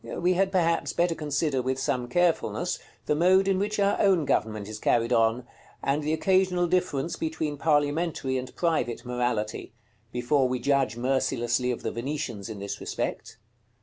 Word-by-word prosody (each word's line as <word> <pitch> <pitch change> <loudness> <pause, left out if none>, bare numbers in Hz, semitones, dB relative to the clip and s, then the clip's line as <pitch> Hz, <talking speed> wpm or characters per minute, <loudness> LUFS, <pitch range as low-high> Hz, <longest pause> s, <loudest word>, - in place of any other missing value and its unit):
We 180 +1 0
had, 190 +1 +1
perhaps, 170 -3 +1
better 175 0 +2
consider, 150 -3 -1
with 130 +1 -1
some 125 -2 -1
carefulness, 175 +5 0 0.3
the - - +1
mode 185 +5 +4
in 195 -1 +2
which 210 +2 -1
our 200 0 +2
own 185 -6 +3
government 110 -5 0
is 110 0 -7
carried 115 +2 +2
on, 115 +1 +2 0.4
and 140 +2 +1
the 150 +1 -1
occasional 180 +2 +2
difference 170 -4 0
between 160 -2 -2
parliamentary 145 -1 0
and 125 - -8
private 160 -10 -1
morality, 120 -4 -2 0.4
before 130 +3 +1
we 125 0 -1
judge 135 -1 +1
mercilessly 125 -1 0
of 125 - -3
the - - -2
Venetians 120 -4 -4
in 110 - -6
this 100 0 -5
respect. - - -4
140 Hz, 160 wpm, -27 LUFS, 125-170 Hz, 0.4 s, mode